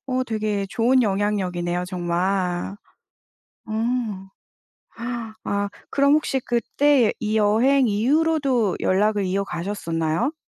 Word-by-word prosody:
어 255 -1 0
되게 215 -3 -1
좋은 250 +3 +3
영향력이네요 185 -4 -1
정말. 180 +1 -1 0.9
어. 215 - -6 1.7
아 200 0 -1 0.2
그럼 280 0 +3
혹시 300 -3 +1
그때의 250 +1 +2
이 215 0 0
여행 240 +6 +3
이후로도 260 - +1
연락을 205 +1 +2
이어가셨었나요? 185 - -2
210 Hz, 225 characters per minute, -23 LUFS, 185-255 Hz, 1.7 s, 좋은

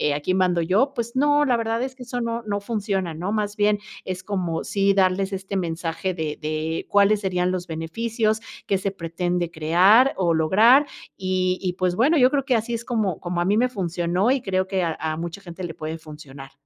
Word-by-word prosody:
aquí 150 +5 -1
mando 180 -2 +2
yo, 205 - +2
pues 235 -2 -4
no, 290 +2 +3
la 255 -3 +2
verdad 230 0 -1
es 260 0 -5
que 255 - -10
eso 245 0 -4
no 230 0 -3
no 205 -2 -2
funciona, 200 -5 -2
¿no? 175 +5 -4
Más 210 -1 -1
bien 210 -1 +2 0.3
es 185 0 -5
como, 180 -5 -2
sí 200 0 +1
darles 190 0 +1
este 195 +1 -5
mensaje 170 +1 -2
de 160 -3 -4
de 155 +1 -3
cuáles 205 +1 +4
serían 180 -2 0
los 185 -1 -3
beneficios, 215 +7 -1 0.3
qué 195 - +2
se 195 +1 -2
pretende 175 -1 -2
crear 180 - +4
o 175 -3 +2
lograr. 215 - +5 0.3
Y 185 -1 0
y, 180 -2 -1
pues, 180 0 -1
bueno, 280 - +3
yo 255 -2 +6
creo 275 -2 0
que 260 -3 +2
así 230 +1 -1
es 230 0 -4
como 215 -8 -1
como 175 -1 -2
a - - 0
mí 205 +3 +2
me 250 +2 +3
funcionó 180 0 0
y 270 -1 +1
creo 190 -2 -1
que 190 -1 -1
a 165 -2 -1
a 155 0 -2
mucha 170 +3 -6
gente 180 -1 -9
le 170 -2 -4
puede 155 +1 -5
funcionar. 145 -4 -11
190 Hz, 215 wpm, -23 LUFS, 170-220 Hz, 0.3 s, yo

